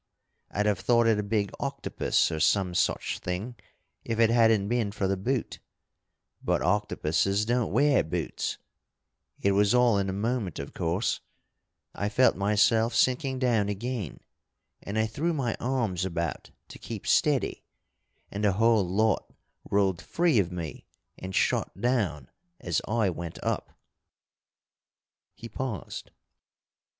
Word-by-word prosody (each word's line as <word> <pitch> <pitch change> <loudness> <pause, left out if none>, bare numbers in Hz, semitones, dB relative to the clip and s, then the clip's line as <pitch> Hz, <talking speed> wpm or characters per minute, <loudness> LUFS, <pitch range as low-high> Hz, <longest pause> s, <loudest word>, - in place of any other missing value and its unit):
I'd 105 - -1
have 105 -3 +1
thought 120 -1 +3
it 110 -2 +3
a - - +2
big 100 -1 -1
octopus, - - 0
or 80 - -3
some 90 +3 +2
such 100 +2 0
thing, 90 +7 -4 0.5
if 115 -1 -3
it 115 -1 +5
hadn't 115 -4 +4
been 115 -2 0
for 100 -2 -1
the 95 - +1
boot. 120 +6 -2 0.8
But - - +1
octopuses 100 0 +1
don't 120 0 0
wear 145 -1 +4
boots. 80 0 -3 0.9
It 100 - +4
was 100 +3 +3
all 120 -4 +4
in 95 0 -1
a - - 0
moment, 105 -2 -2
of 70 - -6
course. 85 +6 -1 0.7
I 100 - -2
felt 125 +5 +4
myself 105 +3 +2
sinking 130 +2 +2
down 115 -6 +1
again, 105 - -4 0.6
and 100 +2 -5
I 110 - +3
threw 150 +10 -1
my 130 -7 -1
arms 115 -8 -1
about 85 -3 -3 0.2
to - - -11
keep - - -7
steady, - - +2 0.7
and 100 +1 -4
the 100 -2 +3
whole 110 +1 +4
lot 110 +2 +1 0.4
rolled 95 -3 +1
free 165 -8 +2
of 90 -3 0
me 85 -3 -6 0.3
and 95 0 -6
shot 95 - 0
down 100 - 0 0.3
as 85 -3 -1
I 110 -3 +1
went 85 -1 -6
up - - -3 0.8
" - - -67 0.7
He 115 - -9
paused. 120 -4 -5
105 Hz, 140 wpm, -27 LUFS, 95-120 Hz, 0.9 s, it